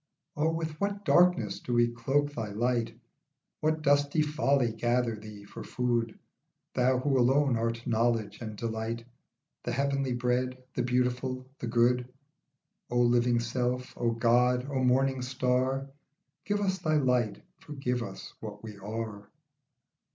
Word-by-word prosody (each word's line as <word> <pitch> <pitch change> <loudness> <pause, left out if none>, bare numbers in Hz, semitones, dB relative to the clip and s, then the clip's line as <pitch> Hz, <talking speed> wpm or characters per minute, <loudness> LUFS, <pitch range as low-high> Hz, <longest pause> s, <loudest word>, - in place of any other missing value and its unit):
O 150 +2 +2
with 160 0 -4
what 200 0 -1
darkness 175 - +4
do 125 - -4
we 120 0 +5
cloak 135 +5 0
thy 115 -5 -3
light, 115 0 0 0.6
What 155 0 0
dusty 145 +2 +3
folly 140 -5 +2
gather 120 +1 +1
thee 105 -1 -10
for 100 - -9
food, 120 -2 -1 0.6
Thou 130 +1 +3
who 135 +1 +1
alone 135 +1 +4
art 115 +1 -2
knowledge 115 -1 0
and 110 -2 -5
delight, 115 +1 -3 0.6
The - - -3
heavenly 140 -1 0
bread, 125 +1 0 0.2
the - - -1
beautiful, 125 +1 0
the 120 - -4
good. 125 +1 +2 0.8
O 120 - -1
living 120 0 +3
self, 125 +1 -2
O 120 - 0
God, 125 +2 +3
O 130 -2 0
morning 130 +1 +2
star, 130 +1 0 0.6
Give 205 0 0
us 190 -1 0
thy 155 -3 +1
light, 125 -6 +1 0.2
forgive 135 -4 -3
us 115 - -7
what - - -8
we 105 -2 -8
are. 105 0 -5
125 Hz, 140 wpm, -29 LUFS, 115-135 Hz, 0.8 s, we